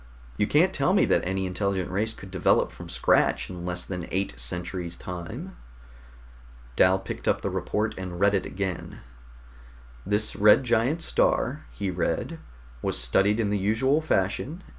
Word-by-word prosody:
You 105 Hz, -, +1 dB
can't 175 Hz, +8 st, +3 dB
tell 175 Hz, +6 st, +2 dB
me -, -, +5 dB
that -, -, +2 dB
any 95 Hz, 0 st, -1 dB
intelligent 95 Hz, 0 st, -2 dB
race 110 Hz, +4 st, 0 dB
could 95 Hz, -, -11 dB
develop 95 Hz, -3 st, +2 dB
from -, -, -10 dB
scratch -, -, +2 dB
in 90 Hz, -1 st, -6 dB
less 90 Hz, 0 st, -2 dB
than 90 Hz, -3 st, -5 dB
eight 95 Hz, -8 st, -1 dB
centuries' 85 Hz, +7 st, -3 dB
time." 90 Hz, -7 st, -7 dB, 1.2 s
Dal 95 Hz, +1 st, +5 dB
picked 95 Hz, -, -7 dB
up -, -, +2 dB
the -, -, -2 dB
report 110 Hz, +1 st, -1 dB
and 90 Hz, -2 st, -6 dB
read 100 Hz, +1 st, +4 dB
it 95 Hz, -, 0 dB
again. 95 Hz, -2 st, -5 dB, 1.0 s
"This 105 Hz, +2 st, 0 dB
red 105 Hz, +5 st, +6 dB
giant 125 Hz, +7 st, +1 dB
star," 150 Hz, -2 st, +1 dB
he 100 Hz, -2 st, -3 dB
read, 90 Hz, -1 st, -2 dB, 0.4 s
"was -, -, -1 dB
studied 95 Hz, -, +2 dB
in 105 Hz, -3 st, +1 dB
the 105 Hz, -, +1 dB
usual 115 Hz, +10 st, +2 dB
fashion. 145 Hz, -, -1 dB
100 Hz, 160 wpm, -26 LUFS, 90-110 Hz, 1.2 s, red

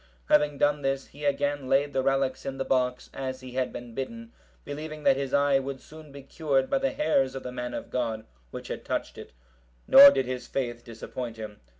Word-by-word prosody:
Having 150 Hz, -1 st, +3 dB
done 145 Hz, +1 st, +2 dB
this, 135 Hz, 0 st, -1 dB
he 145 Hz, +1 st, -9 dB
again 145 Hz, -1 st, 0 dB
laid 145 Hz, +1 st, +2 dB
the 135 Hz, -, +1 dB
relics 135 Hz, 0 st, 0 dB
in 135 Hz, -1 st, -5 dB
the 135 Hz, -, -2 dB
box, 125 Hz, -1 st, 0 dB
as 130 Hz, -1 st, -5 dB
he 130 Hz, -1 st, -9 dB
had 130 Hz, 0 st, -1 dB
been 120 Hz, -1 st, -9 dB
bidden, 230 Hz, -, -6 dB, 0.3 s
believing 155 Hz, +1 st, -7 dB
that 135 Hz, -, +5 dB
his 135 Hz, -1 st, -3 dB
eye 140 Hz, -1 st, +3 dB
would 135 Hz, 0 st, -5 dB
soon 155 Hz, 0 st, -14 dB
be 140 Hz, 0 st, -11 dB
cured 135 Hz, -2 st, -1 dB
by 275 Hz, -, +3 dB
the 270 Hz, 0 st, +1 dB
hairs 135 Hz, -, +1 dB
of 135 Hz, -, -6 dB
the 125 Hz, -, -5 dB
man 125 Hz, 0 st, -5 dB
of -, -, -7 dB
God, 115 Hz, -3 st, -2 dB, 0.2 s
which -, -, -8 dB
had -, -, -5 dB
touched -, -, -3 dB
it; -, -, -10 dB, 0.6 s
nor 280 Hz, +1 st, +11 dB
did 135 Hz, -, 0 dB
his 125 Hz, 0 st, -5 dB
faith 120 Hz, -3 st, -3 dB
disappoint 115 Hz, 0 st, -7 dB
him. 110 Hz, -2 st, -8 dB
135 Hz, 215 wpm, -27 LUFS, 130-145 Hz, 0.6 s, nor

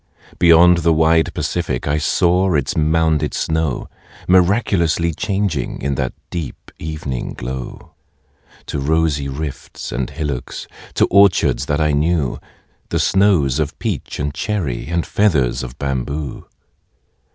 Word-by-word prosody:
Beyond 85 Hz, +1 st, +6 dB
the 85 Hz, 0 st, +3 dB
wide 80 Hz, +1 st, +3 dB
Pacific 75 Hz, -4 st, -2 dB
I 75 Hz, +2 st, +1 dB
saw 90 Hz, +3 st, +2 dB
its 70 Hz, -2 st, 0 dB
mounded 80 Hz, -1 st, +1 dB
snow 80 Hz, -4 st, -1 dB, 0.4 s
Miraculously 90 Hz, -3 st, +2 dB
changing 95 Hz, -, -2 dB
In 70 Hz, +1 st, -1 dB
that 65 Hz, -2 st, -2 dB, 0.2 s
deep 85 Hz, -6 st, -6 dB
evening 75 Hz, -5 st, -4 dB
glow, 65 Hz, +1 st, -7 dB, 0.7 s
To 75 Hz, -, -3 dB
rosy 75 Hz, -1 st, +1 dB
rifts 70 Hz, +1 st, -6 dB
and 65 Hz, -1 st, -2 dB
hillocks, 75 Hz, -6 st, -4 dB, 0.3 s
To -, -, +4 dB
orchards 85 Hz, -10 st, +4 dB
that 75 Hz, +1 st, 0 dB
I 75 Hz, -1 st, +2 dB
knew, 75 Hz, -2 st, 0 dB, 0.5 s
The -, -, 0 dB
snows 90 Hz, -9 st, +3 dB
or 75 Hz, -, +2 dB
peach -, -, -4 dB
and 70 Hz, 0 st, -2 dB
cherry, 80 Hz, -, -2 dB
And 85 Hz, 0 st, -1 dB
feathers 75 Hz, -, +1 dB
of 65 Hz, 0 st, -8 dB
bamboo. 70 Hz, +1 st, -4 dB
80 Hz, 125 wpm, -19 LUFS, 70-85 Hz, 0.7 s, Beyond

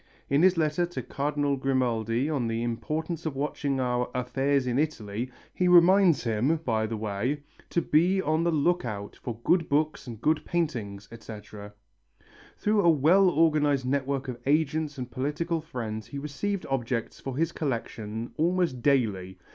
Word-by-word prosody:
In 140 Hz, +2 st, +4 dB
his 185 Hz, 0 st, +5 dB
letter 160 Hz, +2 st, +1 dB
to 150 Hz, -8 st, -5 dB
Cardinal 145 Hz, +2 st, -1 dB
Grimaldi 125 Hz, -2 st, 0 dB
on 140 Hz, -7 st, -1 dB
the 115 Hz, +1 st, -1 dB
importance 155 Hz, +8 st, -3 dB
of 150 Hz, -, -4 dB
watching 140 Hz, -1 st, -1 dB
our 125 Hz, -1 st, 0 dB
"affairs 135 Hz, +2 st, +1 dB
in 125 Hz, +1 st, 0 dB
Italy" 120 Hz, -6 st, -2 dB, 0.2 s
he 180 Hz, -, +1 dB
reminds 180 Hz, -2 st, +6 dB
him, 120 Hz, +7 st, +1 dB
by 110 Hz, -2 st, +1 dB
the 110 Hz, 0 st, -4 dB
way, 110 Hz, +7 st, -2 dB, 0.3 s
to 170 Hz, -, 0 dB
be 175 Hz, +5 st, +3 dB
on 155 Hz, -2 st, +1 dB
the 170 Hz, -, +2 dB
look 170 Hz, +3 st, +2 dB
out 105 Hz, -4 st, -6 dB
for 115 Hz, -3 st, -5 dB
good 175 Hz, -2 st, +2 dB
books 150 Hz, -1 st, 0 dB
and 115 Hz, -3 st, -7 dB
good 155 Hz, +4 st, +1 dB
paintings, 110 Hz, -, -2 dB
etc. 105 Hz, -2 st, -10 dB, 0.8 s
Through 210 Hz, 0 st, +2 dB
a 170 Hz, -, +5 dB
well 165 Hz, +6 st, +5 dB
organized 150 Hz, -4 st, +2 dB
network 135 Hz, +1 st, -1 dB
of 125 Hz, -2 st, -5 dB
agents 150 Hz, 0 st, +1 dB
and 125 Hz, -1 st, -6 dB
political 155 Hz, +5 st, -2 dB
friends 115 Hz, -9 st, -5 dB
he 140 Hz, -, -7 dB
received 150 Hz, +8 st, -3 dB
objects 120 Hz, -3 st, -2 dB
for 135 Hz, -1 st, -5 dB
his 165 Hz, +1 st, +1 dB
collection 115 Hz, -5 st, -4 dB
almost 170 Hz, -5 st, +1 dB
daily. 105 Hz, -9 st, +1 dB
140 Hz, 160 wpm, -27 LUFS, 120-160 Hz, 0.8 s, reminds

